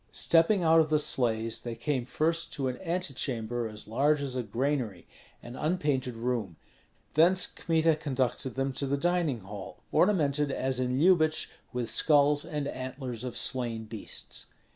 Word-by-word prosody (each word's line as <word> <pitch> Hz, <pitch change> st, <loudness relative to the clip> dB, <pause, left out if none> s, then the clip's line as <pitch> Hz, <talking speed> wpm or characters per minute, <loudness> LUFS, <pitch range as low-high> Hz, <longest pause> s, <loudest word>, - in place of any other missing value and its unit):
Stepping 170 Hz, +4 st, +3 dB
out 165 Hz, 0 st, +5 dB
of 155 Hz, -1 st, +3 dB
the 155 Hz, -, +3 dB
sleighs, 115 Hz, -6 st, +1 dB
they 120 Hz, -1 st, -5 dB
came 125 Hz, +1 st, -2 dB
first 165 Hz, +6 st, -1 dB
to 135 Hz, -2 st, -2 dB
an 125 Hz, -1 st, -4 dB
antechamber 125 Hz, -10 st, -2 dB
as 105 Hz, -1 st, -8 dB
large 145 Hz, +7 st, +2 dB
as 140 Hz, -2 st, -2 dB
a 125 Hz, -, 0 dB
granary, 120 Hz, -2 st, -2 dB, 0.4 s
an 120 Hz, +1 st, -9 dB
unpainted 145 Hz, -6 st, -1 dB
room; 115 Hz, -6 st, -2 dB, 0.6 s
thence 180 Hz, +4 st, +5 dB
Kmita 165 Hz, -1 st, +1 dB
conducted 130 Hz, -3 st, -2 dB
them 135 Hz, 0 st, -1 dB
to 140 Hz, +1 st, -1 dB
the 140 Hz, +1 st, 0 dB
dining 170 Hz, -6 st, 0 dB
hall, 95 Hz, 0 st, -9 dB
ornamented 150 Hz, -7 st, +2 dB
as 130 Hz, -1 st, -1 dB
in 125 Hz, 0 st, 0 dB
Lyubich 155 Hz, -1 st, +3 dB, 0.2 s
with 125 Hz, -2 st, -2 dB
skulls 145 Hz, +4 st, +4 dB
and 150 Hz, -3 st, -4 dB
antlers 130 Hz, -3 st, -6 dB
of 125 Hz, -, -4 dB
slain 120 Hz, -3 st, +1 dB
beasts. 110 Hz, -1 st, -6 dB
135 Hz, 155 wpm, -29 LUFS, 120-155 Hz, 0.6 s, out